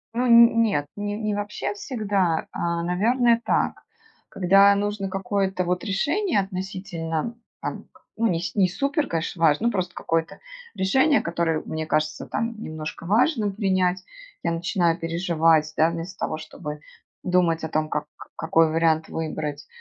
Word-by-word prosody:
Ну, 250 Hz, +1 st, +1 dB
н 235 Hz, 0 st, +7 dB
нет. 200 Hz, -11 st, +1 dB
Ни 205 Hz, 0 st, -3 dB
не 215 Hz, 0 st, -2 dB
вообще 205 Hz, 0 st, -3 dB
всегда, 200 Hz, -, -1 dB
а, 170 Hz, 0 st, -2 dB
наверно, 230 Hz, +7 st, +2 dB
так. -, -, 0 dB, 0.5 s
Когда 195 Hz, +2 st, +5 dB
нужно 205 Hz, -1 st, -2 dB
какое-то 195 Hz, -1 st, -1 dB
вот 180 Hz, 0 st, -1 dB
решение. 290 Hz, -, 0 dB
Относительно, 185 Hz, -1 st, -4 dB, 0.3 s
там -, -, -5 dB
к -, -, -23 dB
ну, 230 Hz, +1 st, +1 dB
ни 170 Hz, -5 st, 0 dB, 0.2 s
не 190 Hz, -3 st, +3 dB
супер, 280 Hz, -, -1 dB
конечно, 165 Hz, +1 st, -2 dB
важно. 165 Hz, +7 st, +3 dB
Ну, -, -, +2 dB
просто 185 Hz, -4 st, -2 dB
какое-то 165 Hz, 0 st, -2 dB, 0.4 s
решение, 265 Hz, +10 st, +3 dB
которое 170 Hz, -2 st, -1 dB
мне 155 Hz, 0 st, -4 dB
кажется 155 Hz, 0 st, -1 dB
там 230 Hz, -1 st, -3 dB
немножко 155 Hz, -2 st, -6 dB
важным 220 Hz, -, +2 dB
принять. 185 Hz, -3 st, +1 dB, 0.4 s
Я 170 Hz, -, 0 dB
начинаю 170 Hz, 0 st, 0 dB
переживать, 165 Hz, -2 st, +2 dB
да. 160 Hz, +1 st, +4 dB
Вместо 170 Hz, +2 st, -6 dB
того, 155 Hz, -, -2 dB
чтобы 150 Hz, -1 st, -8 dB, 0.4 s
думать 175 Hz, -3 st, +2 dB
о 160 Hz, -, -3 dB
том, 155 Hz, 0 st, -1 dB
как 150 Hz, -, -2 dB
к -, -, -12 dB
какой 160 Hz, 0 st, +3 dB
вариант 160 Hz, -1 st, +2 dB
выбрать. 150 Hz, -2 st, -4 dB
185 Hz, 150 wpm, -24 LUFS, 165-205 Hz, 0.5 s, н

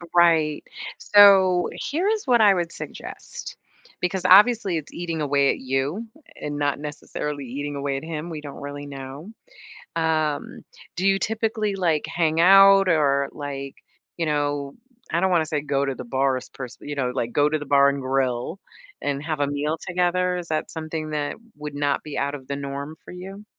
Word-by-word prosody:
Right, 160 Hz, -3 st, +4 dB, 0.3 s
so, 195 Hz, -3 st, +6 dB
here 345 Hz, +7 st, -2 dB
is 435 Hz, -4 st, 0 dB
what 240 Hz, -3 st, +4 dB
I 205 Hz, -2 st, +7 dB
would 170 Hz, -1 st, -2 dB
suggest, -, -, -8 dB, 0.4 s
because 180 Hz, +1 st, -1 dB
obviously, 200 Hz, -2 st, +6 dB
it's 150 Hz, -, -7 dB
eating 170 Hz, -2 st, -4 dB
away 140 Hz, -1 st, +2 dB
at -, -, -4 dB
you 135 Hz, -, -2 dB, 0.3 s
and 145 Hz, -1 st, -4 dB
not 145 Hz, -1 st, 0 dB
necessarily 150 Hz, -1 st, -5 dB
eating 145 Hz, +4 st, -5 dB
away 140 Hz, -1 st, -2 dB
at 135 Hz, -, -7 dB
him. 160 Hz, +1 st, -5 dB
We 155 Hz, -2 st, -6 dB
don't 145 Hz, -2 st, -9 dB
really 145 Hz, 0 st, -6 dB
know. 140 Hz, +7 st, -8 dB, 0.7 s
Um, 155 Hz, -2 st, -1 dB, 0.3 s
do 185 Hz, +2 st, 0 dB
you 195 Hz, 0 st, +3 dB
typically, 220 Hz, -1 st, -1 dB
like, 165 Hz, -5 st, +1 dB
hang 160 Hz, -1 st, 0 dB
out 195 Hz, +1 st, +7 dB
or, 140 Hz, -4 st, +2 dB
like, 140 Hz, -2 st, -6 dB, 0.4 s
you 165 Hz, -2 st, -1 dB
know, 145 Hz, -2 st, -1 dB, 0.4 s
I 170 Hz, -, +1 dB
don't 190 Hz, 0 st, +2 dB
wanna 170 Hz, -3 st, +3 dB
say 150 Hz, -1 st, -1 dB
go 140 Hz, -1 st, 0 dB
to 135 Hz, -1 st, -2 dB
the 125 Hz, -, -8 dB
bars 130 Hz, +1 st, 0 dB
per 135 Hz, -2 st, -7 dB
se -, -, -14 dB
you 145 Hz, -, -4 dB
know, 130 Hz, -3 st, -1 dB
like 120 Hz, -2 st, -2 dB
go 145 Hz, 0 st, +3 dB
to 155 Hz, 0 st, 0 dB
the 145 Hz, -, -7 dB
bar 140 Hz, 0 st, +5 dB
and 140 Hz, 0 st, -3 dB
grill 130 Hz, +4 st, -1 dB, 0.4 s
and 140 Hz, 0 st, -2 dB
have 155 Hz, -2 st, -3 dB
a 145 Hz, -, +2 dB
meal 145 Hz, +3 st, -1 dB
together, 180 Hz, 0 st, +1 dB
is 175 Hz, -2 st, -6 dB
that 155 Hz, 0 st, -2 dB
something 155 Hz, -1 st, -5 dB
that 150 Hz, -1 st, -2 dB, 0.2 s
would 150 Hz, -1 st, -7 dB
not 145 Hz, -1 st, 0 dB
be 150 Hz, -, -7 dB
out 140 Hz, +1 st, -1 dB
of 130 Hz, -3 st, -9 dB
the 140 Hz, -, -2 dB
norm 140 Hz, +2 st, -5 dB
for -, -, -11 dB
you? 195 Hz, +3 st, -9 dB
150 Hz, 190 wpm, -24 LUFS, 140-180 Hz, 0.7 s, I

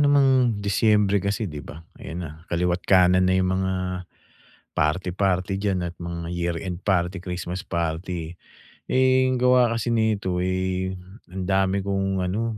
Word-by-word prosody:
namang 145 Hz, -1 st, +5 dB, 0.4 s
Disyembre 100 Hz, -1 st, +3 dB
kasi, 100 Hz, +3 st, -1 dB
'di 75 Hz, -7 st, -5 dB
ba? 80 Hz, +3 st, -11 dB, 0.2 s
Ayan 85 Hz, +2 st, -6 dB
na, 80 Hz, -, -6 dB, 0.2 s
kaliwa't 90 Hz, +1 st, 0 dB
kanan 90 Hz, -1 st, +5 dB
na 95 Hz, -, +3 dB
'yong 95 Hz, 0 st, +1 dB
mga 95 Hz, 0 st, 0 dB, 1.0 s
party-party 90 Hz, +3 st, 0 dB
dyan 100 Hz, -3 st, 0 dB
at 85 Hz, -, -4 dB
mga 85 Hz, 0 st, -5 dB
year-end 85 Hz, +1 st, -3 dB
party, 90 Hz, -1 st, +1 dB
Christmas 90 Hz, 0 st, -4 dB
party. 85 Hz, 0 st, -3 dB, 0.6 s
Eh, 130 Hz, 0 st, +4 dB
gawa 125 Hz, -1 st, +4 dB
kasi 115 Hz, -, -3 dB
nito, 105 Hz, -5 st, +1 dB
eh, 95 Hz, 0 st, -1 dB, 0.4 s
ang 95 Hz, 0 st, -4 dB
dami 95 Hz, 0 st, +2 dB
kong 95 Hz, -1 st, -1 dB
ano, 110 Hz, +4 st, -2 dB
95 Hz, 140 wpm, -24 LUFS, 90-100 Hz, 1.0 s, namang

